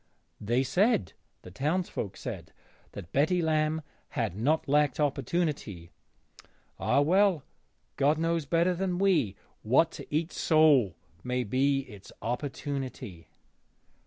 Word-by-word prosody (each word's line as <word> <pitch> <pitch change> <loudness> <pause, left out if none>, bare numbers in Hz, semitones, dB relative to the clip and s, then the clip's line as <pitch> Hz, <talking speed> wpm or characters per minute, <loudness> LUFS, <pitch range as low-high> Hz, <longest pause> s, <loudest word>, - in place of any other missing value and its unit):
They 120 +5 +1
said 135 - +1 0.3
(the 90 - -11
townsfolk 145 - -2
said) - - -7 0.4
that 85 - -9
Betty 160 +6 +2
Lamb 155 -1 0 0.3
had 85 - -2
not 145 +11 0
lacked 150 +1 +2
opportunity. 145 - -2 0.9
Ah 140 - +2
well, 180 0 +3 0.5
God 145 +3 +3
knows 165 -1 0
better 170 +4 +2
than 180 0 -2
we 165 - +2 0.3
what 135 +9 +3
to - - -9
each 160 +3 -1
soul 145 - +4 0.3
may 125 0 -1
be 135 +4 +1
its 105 -8 -13
opportunity. 130 - -5
145 Hz, 115 wpm, -29 LUFS, 125-165 Hz, 0.9 s, soul